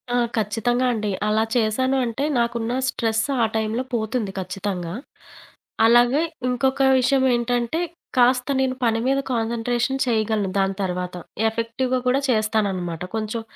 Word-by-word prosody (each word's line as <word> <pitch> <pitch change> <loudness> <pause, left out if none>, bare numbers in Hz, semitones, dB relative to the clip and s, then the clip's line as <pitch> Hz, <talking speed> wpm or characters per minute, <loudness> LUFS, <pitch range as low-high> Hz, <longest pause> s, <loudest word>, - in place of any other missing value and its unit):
ఆ! - - +3 0.2
ఖచ్చితంగా 225 +4 0
అండి. 210 -2 -2 0.2
అలా 215 +1 +2
చేశాను 250 +4 +1
అంటే 235 +4 -3 0.2
నాకున్న 235 0 -1 0.2
స్ట్రెస్ 225 -1 0 0.2
ఆ - - +5
టైంలో 220 +3 -1
పోతుంది 220 -2 -1
ఖచ్చితంగా. 185 -2 -4 0.9
అలాగ 240 +2 +5 0.4
ఇంకొక 265 +2 +1 0.2
విషయం 265 +1 +2
ఏంటంటే 240 +5 -1 0.4
కాస్త 250 +2 +3
నేను 260 -1 +1
పని 225 -1 +2
మీద 275 +1 +2
కాన్సంట్రేషన్ 240 +3 -1
చేయగలను 220 -4 0
దాని 195 0 +1
తర్వాత. 180 -1 -3 0.3
ఎఫెక్టివ్‌గా 240 +3 -1
కూడా 260 +2 +3
చేస్తాననమాట. 200 -7 0
కొంచెం 220 +1 -2
230 Hz, 125 wpm, -23 LUFS, 215-250 Hz, 0.9 s, ఆ